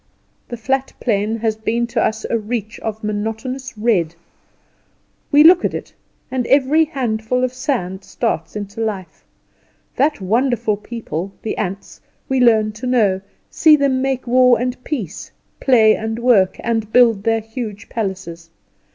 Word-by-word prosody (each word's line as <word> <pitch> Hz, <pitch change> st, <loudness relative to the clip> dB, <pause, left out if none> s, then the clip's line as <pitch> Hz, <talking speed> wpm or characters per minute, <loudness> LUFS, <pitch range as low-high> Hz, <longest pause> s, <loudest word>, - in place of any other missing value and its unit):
The 240 Hz, -, -5 dB
flat 265 Hz, +4 st, -1 dB
plain 215 Hz, -1 st, 0 dB
has 220 Hz, -2 st, 0 dB
been 225 Hz, +2 st, -1 dB
to 235 Hz, -1 st, -1 dB
us 220 Hz, 0 st, -1 dB
a -, -, -1 dB
reach 220 Hz, -1 st, -4 dB
of 220 Hz, 0 st, -5 dB
monotonous 225 Hz, +5 st, -4 dB
red. 190 Hz, -8 st, +1 dB, 1.2 s
We 290 Hz, 0 st, +7 dB
look 350 Hz, +2 st, +7 dB
at -, -, -1 dB
it, -, -, -7 dB, 0.4 s
and 255 Hz, -2 st, -1 dB
every 285 Hz, +4 st, +4 dB
handful 250 Hz, -4 st, -1 dB
of 255 Hz, 0 st, 0 dB
sand 195 Hz, -8 st, -3 dB
starts 225 Hz, +3 st, -3 dB
into 205 Hz, +1 st, -5 dB
life. 195 Hz, -7 st, -4 dB, 0.7 s
That 295 Hz, +1 st, +2 dB
wonderful 220 Hz, +1 st, +1 dB
people, 200 Hz, -5 st, -5 dB
the 220 Hz, -, -2 dB
ants, 195 Hz, -1 st, -5 dB, 0.3 s
we 265 Hz, -1 st, 0 dB
learn 220 Hz, -3 st, +4 dB
to 220 Hz, +4 st, -7 dB
know; 210 Hz, -7 st, +2 dB, 0.3 s
see 315 Hz, -2 st, +6 dB
them 275 Hz, -3 st, +1 dB
make 265 Hz, -1 st, -1 dB
war 250 Hz, 0 st, +4 dB
and 250 Hz, +1 st, -3 dB
peace, 215 Hz, -, -5 dB, 0.3 s
play 225 Hz, -5 st, +5 dB
and 220 Hz, +1 st, -4 dB
work, 230 Hz, -6 st, +3 dB
and 225 Hz, -2 st, -2 dB
build 230 Hz, -4 st, +5 dB
their 225 Hz, +1 st, +1 dB
huge 220 Hz, -2 st, -7 dB
palaces. 185 Hz, -6 st, -5 dB
225 Hz, 150 wpm, -19 LUFS, 210-255 Hz, 1.2 s, We